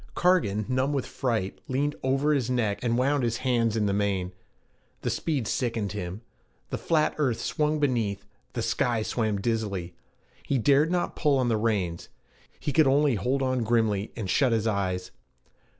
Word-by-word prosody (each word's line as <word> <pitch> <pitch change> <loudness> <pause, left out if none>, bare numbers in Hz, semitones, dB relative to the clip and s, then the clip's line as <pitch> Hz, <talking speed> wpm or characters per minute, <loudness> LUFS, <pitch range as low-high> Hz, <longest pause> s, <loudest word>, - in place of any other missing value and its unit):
Cargan, 110 - +2
numb 130 +2 0
with 135 -3 -1
fright, 110 -7 -2
leaned 145 +3 0
over 135 +3 +2
his 130 -4 0
neck 115 -5 0
and 120 -1 +1
wound 140 +3 +2
his 115 -1 0
hands 115 -3 +2
in 105 - +1
the 100 - +1
mane. 100 -3 0 0.7
The - - -1
speed 145 -8 -1
sickened 115 -5 -1
him. 95 0 -5 0.5
The - - -2
flat 155 -2 +2
earth 130 -6 +1
swung 150 0 0
beneath, 110 -8 0 0.3
the - - -2
sky 115 -3 0
swam 110 -3 -1
dizzily. 100 -6 -2 0.5
He 140 - 0
dared 140 +6 +4
not 175 0 -1
pull 145 -3 +2
on 125 -2 +1
the 115 - +2
reins; 100 -7 -1 0.5
he 145 - -2
could 155 -3 +5
only 140 +1 +4
hold 125 +6 0
on 130 -2 0
grimly 110 -3 +1
and 110 -4 -4
shut 130 +5 +3
his 110 -1 +1
eyes. 95 -4 -1
120 Hz, 170 wpm, -27 LUFS, 105-135 Hz, 0.7 s, could